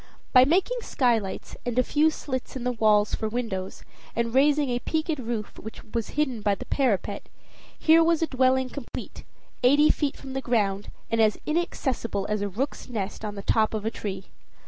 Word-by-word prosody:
By 255 -1 +8
making 380 - +2
skylights, 230 - 0
and 245 -1 -3
a 255 - +5
few 305 +5 +3
slits 260 -5 -5
in 255 - -4
the 250 - +1
walls 215 -3 +3
for 220 - -1
windows, 215 -5 -4 0.3
and 230 0 -1
raising 285 0 +3
a 245 - 0
peaked 315 +2 -1
roof 230 -4 -4
which 220 - -9
was 230 -3 -2
hidden 265 -7 0
by 205 -1 +2
the - - -8
parapet, 250 -9 -1 0.5
here 325 +1 +5
was 330 0 +2
a - - +4
dwelling 260 -2 +2
complete, 280 -5 -7 0.4
eighty 290 +5 +5
feet 290 -3 -1
from 270 -1 -9
the 270 - -2
ground, 205 -5 0 0.2
and 230 0 +3
as 215 -1 +3
inaccessible 265 - -1
as 210 -1 0
a 205 - -1
rook's 255 +7 -4
nest 210 -3 -4
on 210 -1 -4
the 200 - -7
top 220 +1 +2
of 215 -1 -4
a 225 - 0
tree. 195 -4 -5
245 Hz, 190 wpm, -26 LUFS, 215-280 Hz, 0.5 s, By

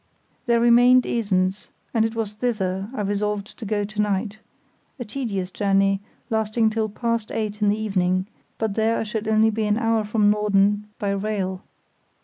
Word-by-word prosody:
There 235 -1 +4
remained 245 +2 +6
Esens, 195 -4 0 0.2
and 225 - +3
it 225 0 -1
was 220 -2 -2
thither 205 -4 -2
I 260 - -4
resolved 205 0 -2
to 230 - -6
go 205 0 0
to 210 +1 -2
night—a 210 +5 -5
tedious 210 -6 -3
journey, 195 0 +2 0.3
lasting 220 0 +1
till 220 0 -1
past 230 +1 -2
eight 210 -1 -3
in 205 - +4
the 205 - +1
evening; 185 -3 0 0.3
but 220 -2 -1
there 225 +2 +1
I - - -1
should 220 0 -4
only 220 0 +4
be 220 0 -1
an 210 0 +1
hour 225 -2 +1
from 210 0 +2
Norden 205 0 +2
by 200 -1 -1
rail. 195 -2 -2
210 Hz, 165 wpm, -23 LUFS, 200-225 Hz, 0.3 s, remained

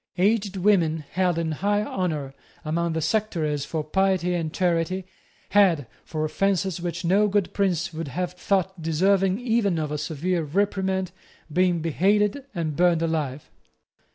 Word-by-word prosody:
Aged 200 +1 +1
women 170 -6 +2
held 180 -2 +1
in 165 -1 -1
high 205 +6 0
honour 155 -10 -3 0.3
among 170 +2 0
the 160 -1 -1
sectaries 160 -7 0
for 155 -1 -3
piety 185 +2 +1
and 165 -3 -2
charity 180 +1 0 0.4
had, 185 -9 +4 0.2
for 155 -1 -3
offences 190 +2 0
which 175 0 -4
no 200 +5 +4
good 200 -2 0
prince 180 -4 0
would 160 0 -4
have 180 +5 -3
thought 190 0 -1
deserving 190 +5 +2
even 225 -7 +1
of 155 -2 -2
a 150 - -2
severe 165 +4 -1
reprimand, 190 +3 0 0.4
been 180 -1 +2
beheaded 205 - +1
and 160 -4 -2
burned 170 -1 +3
alive. 150 -4 -2
180 Hz, 145 wpm, -25 LUFS, 160-195 Hz, 0.4 s, had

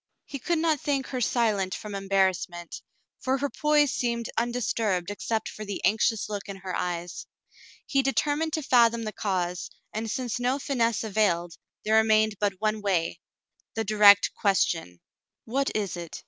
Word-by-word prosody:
He 280 - -7
could 340 +5 0
not 315 -3 +1
think 275 -2 0
her 255 -2 -3
silent 215 -6 +1
from 210 -1 -7
embarrassment, 190 -3 -1 0.4
for 260 +1 0
her 280 0 -2
poise 295 +1 +2
seemed 235 -1 -2
undisturbed 225 -6 -1
except 220 +2 -2
for 215 - -7
the 200 -2 -5
anxious 220 +1 +2
look 205 -1 -5
in 200 - -5
her 190 -2 -6
eyes. 175 0 -4 0.6
He 275 - +2
determined 290 +3 0
to 315 - -1
fathom 235 -3 +4
the 215 - -3
cause, 180 -4 -2 0.2
and 220 +1 -3
since 245 0 -2
no 250 +2 +1
finesse 235 -6 0
availed, 190 -6 0 0.3
there 220 +1 +4
remained 220 -1 +3
but 205 -2 +1
one 215 0 0
wav, 180 -5 0 0.3
— - - -45
the 225 - 0
direct 205 -1 +6
question. 165 - 0 0.5
"What 270 +4 0
is 205 -4 -1
it 170 -2 -7
215 Hz, 160 wpm, -27 LUFS, 195-245 Hz, 0.6 s, direct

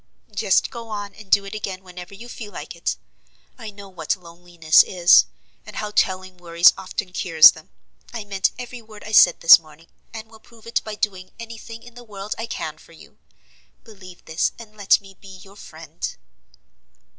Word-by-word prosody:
"Just 200 -1 +1
go 230 -2 -9
on, 205 -1 -6
and 205 -1 -15
do 200 - +3
it 195 - -9
again 195 -3 -6
whenever 180 +1 -11
you 230 +4 -11
feel 220 -3 -9
like 175 - -9
it. 170 - -3 0.6
I 220 - -8
know 200 -1 -12
what 170 -3 -3
loneliness 170 -2 +2
is, 175 -1 +5 0.4
and - - -13
how 210 -1 -4
telling 185 -2 -1
worries 170 0 +4
often 190 0 -6
cures 160 -4 +7
them. - - -16 0.4
I 230 -3 -6
meant 195 -2 0
every 245 -1 -8
word 215 -2 -14
I 215 - -8
said 215 - +6
this 165 - +9
morning, 160 0 -19 0.2
and 220 -1 -9
will 220 0 -18
prove 225 0 -20
it 230 - -1
by 215 -1 -7
doing 190 -3 -3
any 230 -1 -9
thing 230 0 -11
in 245 - -14
the 245 +1 -13
world 205 -2 -7
I 225 - -4
can - - -6
for - - -19
you. - - -18 0.6
Believe 190 -5 -15
this, 160 +1 -1
and 220 -2 -13
let 205 -2 +3
me 195 -1 -15
be 190 -2 -12
your 195 0 -17
friend." 160 -4 -8
195 Hz, 190 wpm, -22 LUFS, 180-220 Hz, 0.6 s, this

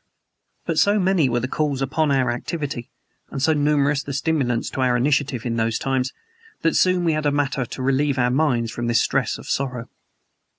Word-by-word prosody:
But - - 0
so 205 +1 +4
many 185 -7 +2
were 120 0 0
the 130 - -2
calls 145 -1 -1
upon 145 +3 0
our 130 -3 +2
activity, 135 -1 -4 0.4
and 135 - -5
so 160 +4 +3
numerous 145 -1 +2
the 140 - -6
stimulants 135 -5 0
to 130 - -3
our 125 -1 +2
initiative 140 -1 0
in 115 -1 -1
those 115 0 0
times, 135 -1 -1 0.5
that 165 -1 +2
soon 185 -1 +3
we 165 -2 +2
had 150 -1 0
matter 140 -2 0
to 130 +2 -6
relieve 135 +1 +1
our 125 -1 +2
minds 125 -5 +1
from 120 +1 -4
this 115 -1 +3
stress - - 0
of - - -12
sorrow. 125 -3 -3
135 Hz, 195 wpm, -22 LUFS, 125-150 Hz, 0.5 s, so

